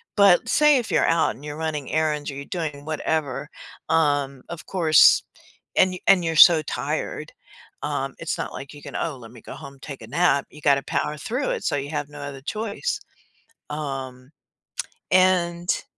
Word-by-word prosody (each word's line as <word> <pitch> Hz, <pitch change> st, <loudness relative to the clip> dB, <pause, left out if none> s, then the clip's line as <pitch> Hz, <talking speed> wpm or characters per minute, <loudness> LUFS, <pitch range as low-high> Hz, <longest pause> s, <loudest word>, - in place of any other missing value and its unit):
but 200 Hz, -4 st, +5 dB
say 300 Hz, -2 st, +5 dB
if 235 Hz, -, -3 dB
you're -, -, +3 dB
out 165 Hz, -1 st, +2 dB
and 140 Hz, -, -15 dB
you're 150 Hz, 0 st, -6 dB
running 155 Hz, -4 st, -3 dB
errands 155 Hz, -2 st, 0 dB
or -, -, -9 dB
you're 140 Hz, +1 st, -7 dB
doing 150 Hz, -5 st, -5 dB
whatever, 150 Hz, -3 st, -2 dB, 0.4 s
um, 145 Hz, -4 st, +1 dB
of 170 Hz, -1 st, -8 dB
course, 165 Hz, -5 st, +5 dB, 0.5 s
and 185 Hz, 0 st, +4 dB
and 185 Hz, -2 st, +6 dB
you're 165 Hz, 0 st, -1 dB
so 165 Hz, -2 st, +9 dB
tired, -, -, -4 dB, 0.5 s
um, -, -, -2 dB
it's -, -, -3 dB
not -, -, -4 dB
like 140 Hz, +2 st, -8 dB
you 145 Hz, -, -12 dB
can, -, -, -9 dB
"Oh, 155 Hz, -5 st, -2 dB
let 115 Hz, -2 st, -12 dB
me 120 Hz, -, -14 dB
go -, -, -9 dB
home, 140 Hz, 0 st, -11 dB
take 140 Hz, -3 st, -8 dB
a -, -, -10 dB
nap," 145 Hz, +1 st, +2 dB
you 150 Hz, -, -14 dB
gotta 140 Hz, -1 st, +3 dB
power 150 Hz, -, -2 dB
through 250 Hz, -, -2 dB
it, -, -, -3 dB
so -, -, 0 dB
you 140 Hz, +1 st, -4 dB
have 145 Hz, -2 st, -3 dB
no 145 Hz, -, -11 dB
other 140 Hz, -1 st, -7 dB
choice, 215 Hz, -, -3 dB, 0.7 s
um, 135 Hz, -3 st, -6 dB, 0.8 s
and 180 Hz, -1 st, +2 dB
150 Hz, 180 wpm, -23 LUFS, 140-175 Hz, 0.8 s, so